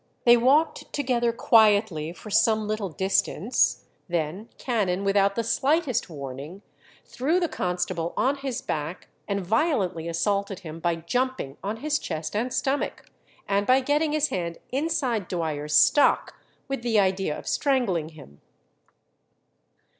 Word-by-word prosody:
They 240 0 +8
walked 270 +7 +2
together 245 -4 0
quietly 210 -8 +3
for 210 +4 -11
some 220 0 +3
little 215 -2 -2
distance, 195 +4 +1 0.2
then 175 +6 -3
Cannon, 200 -6 -1
without 200 0 +2
the 230 - 0
slightest 265 - +1
warning, 145 +5 -8 0.4
threw 305 +8 0
the 345 - +1
constable 180 - -2
on 275 +2 +2
his 265 -2 -4
back, 155 +4 -4 0.2
and 200 -2 -2
violently 195 - 0
assaulted 195 +3 -1
him 165 -2 -8
by 170 0 0
jumping 170 - -2
on 205 +3 -3
his 300 +5 -1
chest 160 +1 -5
and 240 +4 -1
stomach, 275 +2 -2 0.4
and 200 0 +1
by 255 +1 +5
getting 295 +3 +1
his 305 0 +2
hand 170 -2 -3
inside 265 - -1
Dwyer's 150 -4 -2
stock, 290 - +4 0.3
with 275 -2 -3
the 235 -3 +2
idea 190 -5 0
of - - -11
strangling 230 - 0
him. 145 - -15
205 Hz, 135 wpm, -25 LUFS, 170-255 Hz, 0.4 s, They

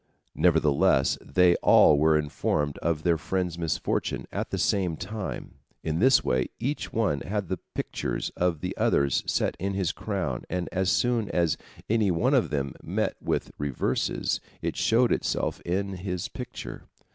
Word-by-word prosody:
Nevertheless 75 -4 +3
they 90 +5 +4
all 75 - +6
were 80 +1 +4
informed 75 -1 -1
of 80 -2 -1
their 85 -3 +2
friend's 90 +1 -2
misfortune 80 -2 -1
at - - -3
the - - -2
same 90 -5 +1
time, 105 +1 -5 0.3
in 80 +1 -1
this 130 +5 +5
way: 65 +1 +1
Each 140 +5 -3
one 100 -11 +1
had 100 -3 -3
the 95 - -2 0.2
pictures - - -3
of 85 -4 0
the - - -3
others 70 -2 +2
set - - 0
in 100 +1 -2
his 95 -4 0
crown, 90 - -3
and 90 0 -2
as 95 0 0
soon 120 -1 +1
as 85 -3 +1 0.3
any 110 -2 +2
one 110 +11 +2
of 130 -4 +3
them 70 -3 -2
met - - -1
with - - -1
reverses, 70 -3 -1 0.2
it - - -3
showed 120 +2 +3
itself - - -1
in 95 +3 -1
his 90 -1 -4
picture. - - -8
90 Hz, 155 wpm, -27 LUFS, 75-100 Hz, 0.3 s, all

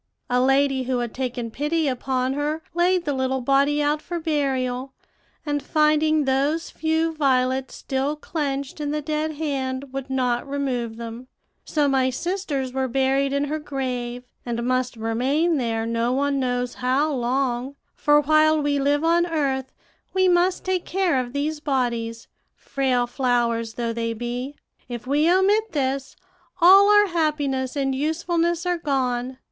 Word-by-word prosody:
A 250 0 +3
lady 270 0 +2
who 255 0 0
had 240 -2 -3
taken 245 -3 -3
pity 300 +5 0
upon 260 0 -1
her 300 +3 -2
laid 350 +1 +2
the 290 - 0
little 265 0 0
body 280 +3 +2
out 295 +1 +1
for 345 +1 -4
burial, 270 -4 -1 0.5
and 290 -1 -1
finding 305 0 +2
those 280 +5 0
few 320 +1 0
violets 260 -3 +1
still 270 +2 -2
clinched 280 -2 -4
in 295 - -2
the 300 0 -2
dead 310 +1 -2
hand, 275 -3 -3
would 270 0 -5
not 250 -1 0
remove 250 -5 -2
them; 235 +2 -7 0.4
so 295 -2 +1
my 265 -2 +2
sisters 285 -3 -3
were 265 0 0
buried 270 +2 +1
in 280 +1 0
her 300 +2 -2
grave, 250 -4 -4 0.2
and 235 -1 -3
must 255 0 0
remain 265 +9 +1
there 225 -3 -1
no 230 +1 0
one 280 +1 +1
knows 245 -1 -1
how 275 +5 +1
long; 255 +1 -1 0.2
for 295 0 +4
while 310 +1 +4
we 290 -1 0
live 290 +2 +1
on 340 +1 +3
earth 270 -5 -1 0.4
we 375 0 +4
must 355 +1 +2
take 370 -1 0
care 365 -7 +1
of 245 -1 -4
these 295 +3 -2
bodies, 235 -5 -2 0.3
frail 260 -3 0
flowers 240 -3 0
though 235 -1 -2
they 230 0 -2
be. 245 +4 -4 0.3
If 240 -1 -6
we 295 +5 +3
omit 405 +4 +2
this, 270 -2 -2 0.4
all 385 +4 +8
our 415 0 +6
happiness 295 -5 -1
and 270 -2 0
usefulness 335 +4 0
are 355 -1 0
gone. 255 -4 -1
275 Hz, 155 wpm, -23 LUFS, 255-310 Hz, 0.5 s, all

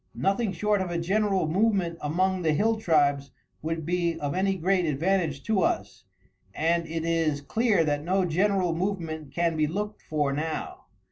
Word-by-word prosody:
Nothing 200 +2 0
short 205 +3 0
of 185 - -2
a 170 - -2
general 195 +1 +1
movement 185 -1 +1
among 185 +5 0
the 160 -3 +2
hill 220 +8 +2
tribes 145 -7 +2 0.3
would 160 0 -3
be 170 0 0
of 145 -1 -2
any 195 +1 +1
great 185 +1 +1
advantage 160 -1 0
to 215 -3 +1
us, - - -1 0.5
and 165 +1 +1
it 165 0 -3
is 165 -3 +1
clear 210 - +1
that 145 -1 -1
no 185 +3 +1
general 185 +1 +1
movement 165 -5 -3
can 170 -1 0
be 155 -1 +1
looked 210 +6 -4
for 145 -3 -1
now. 160 - -4
170 Hz, 165 wpm, -27 LUFS, 155-195 Hz, 0.5 s, the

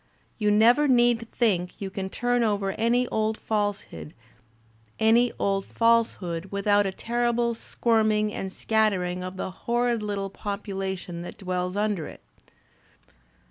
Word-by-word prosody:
"You 210 -1 +2
never 235 +8 +5
need 240 -3 +3
think 185 -7 0
you 195 -2 -5
can 190 0 -4
turn 245 +3 0
over 200 -3 0
any 240 +4 +1
old 220 0 0
falsehood 205 -6 -3 0.8
without 205 -3 +2
a - - -2
terrible 235 +2 0
squirming 215 -2 +1
and 190 - -4
scattering 190 -4 0
of 185 +1 -6
the 190 - -4
horrid 240 +2 0
little 200 -2 -3
population 195 -4 -5
that 175 - -8
dwells 180 -1 -3
imder 205 -6 -1
it." - - -13
210 Hz, 115 wpm, -26 LUFS, 190-230 Hz, 0.8 s, never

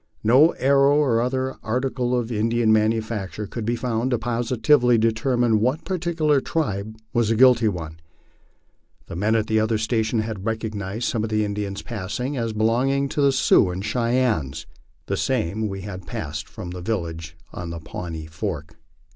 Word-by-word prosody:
No 130 +9 +6
arrow, 140 +1 +4
or 125 -6 +3
other 130 +1 -1
article 125 +2 -1
of 120 -1 -2
Indian 115 0 +2
manufacuture, 110 -2 0
could 110 +2 -6
be 120 +2 0
found 120 0 -1
to 125 - +1
positively 120 +2 +2
determine 115 0 +2
what 130 +8 0
particular 165 -6 +1
tribe 110 - -2 0.2
was 120 -2 +2
the 115 - +2
guilty 125 -1 +5
one. 80 -5 -4 1.1
The - - -8
men 105 +5 +1
at 110 0 0
other 110 +1 +2
stations 110 0 0
had 110 -3 -5
recognized 110 -1 -3
some 110 - -1
of 110 - -2
the 110 -1 +1
Indians 100 -1 -4
passing 120 +6 -4
as 115 -3 -1
belonging 125 +6 +1
to 145 - -1
the 140 -1 +5
Sioux 125 -6 +4
and 90 +3 -4
Cheyennes, 115 - 0 0.4
the - - -2
same 105 +7 -1
we 95 -1 -5
had 95 -2 -8
passed 75 0 -5
from 95 -6 -8
the 90 0 -7
village 85 -5 -4 0.2
on 85 -1 -6
Pawnee 80 0 -6
Fork. 80 0 -5
110 Hz, 160 wpm, -23 LUFS, 100-125 Hz, 1.1 s, No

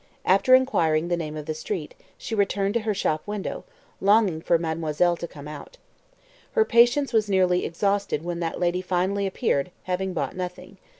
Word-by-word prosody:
After 195 +8 +5
inquiring 170 -11 +2
the 175 - +2
name 155 -2 -5
of 150 - -6
the 155 - -3
street, 155 0 -5 0.2
she 230 - -7
returned 200 -1 +1
to 235 - +2
her 215 -1 -1
shop 155 -5 0
window, 205 -1 -4 0.3
longing 200 -5 +3
for 170 - +3
mademoiselle 165 +1 0
to 170 - -5
come 145 -2 -11
out. 150 - -10 0.8
Her 445 -2 +4
patience 240 - +4
was 215 -2 +2
nearly 185 -2 +2
exhausted 195 -2 -1
when 175 -1 -3
that 165 -1 -3
lady 180 +1 0
finally 190 +2 0
appeared, 185 - 0
having 185 +1 -2
bought 165 - -3
nothing. 185 +1 -7
185 Hz, 175 wpm, -25 LUFS, 165-205 Hz, 0.8 s, After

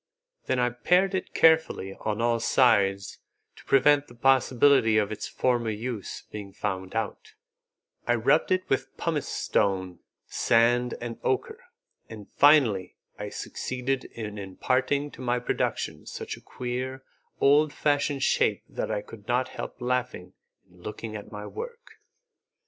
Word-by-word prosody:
Then - - +1
I 125 0 +2
pared 180 +10 +2
it 190 - -3
carefully 160 -12 +3
on 105 +2 -3
all 120 -1 +2
sides 100 -6 +2 0.4
to - - -16
prevent 145 +1 +4
the 120 - -15
possibility 130 -2 +4
of 105 -1 +1
its 110 - -4
former 120 -3 0
use 110 0 -5
being 100 -2 -8
found 95 -1 -4
out; 110 -1 -4 0.7
I 120 - +3
rubbed 135 +7 +2
it 185 0 +1
with 135 0 -2
pumice 160 -4 -2
stone, 95 -4 -1 0.3
sand, 120 +1 +2
and 120 -1 -6
ochre, 450 +3 -2 0.4
and 105 -3 -10
finally 135 -11 +4 0.2
I - - -4
succeeded 130 +1 -3
in 105 -2 -7
imparting 130 +9 -1
to - - -12
my 125 -1 0
production 125 - -2
such - - -6
a - - -16
queer, 130 +1 -5 0.4
old 145 +2 +4
fashioned 145 -2 0
shape - - +2
that - - -4
I 105 - -2
could 105 -2 -13
not 125 +1 +1
help - - -7
laughing 125 0 -2 0.3
in 90 0 -21
looking 105 +2 -6
at 105 - -8
my 105 -1 -7
work. 475 - -9
125 Hz, 145 wpm, -27 LUFS, 105-140 Hz, 0.7 s, prevent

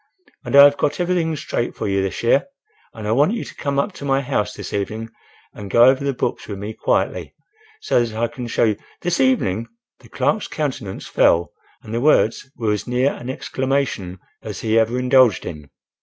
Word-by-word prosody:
"And - - -2
I 140 - +11
have 145 0 +6
got 150 +2 -1
everything 175 -3 0
straight 130 -5 -3
for - - -3
you 100 -1 +1
this 95 +3 -3
year; 125 - +3 0.4
and 110 -2 -7
I - - 0
want 145 - +3
you 235 - -3
to - - -10
come 140 -1 -3
up 140 +9 +1
to 165 - -11
my 135 -1 +2
house 105 -5 -1
this - - -7
evening 110 +3 -3 0.4
and 100 -1 -8
go 115 +4 +5
over 130 +2 +4
the 140 - +1
books 130 - -3
with 100 - -5
me 105 +3 -6
quietly, - - -1 0.5
so 120 - +2
that 110 -2 -5
I 115 +1 +1
can 120 +1 -7
show - - +1
you—" 110 -3 +2 0.2
"This 175 -1 -1
evening?" 115 - +1 0.3
The - - -18
clerk's - - 0
countenance - - -4
fell 85 +1 +2 0.3
and 110 - -8
the 115 - -1
words 135 -3 +2
were 110 -3 0
as 105 - -4
near 125 +3 +1
an 120 - -8
exclamation 130 -9 -2 0.2
as - - -7
he 110 0 +2
ever 115 +2 +1
indulged 125 -3 +4
in. 75 -4 -8
120 Hz, 205 wpm, -21 LUFS, 110-140 Hz, 0.5 s, I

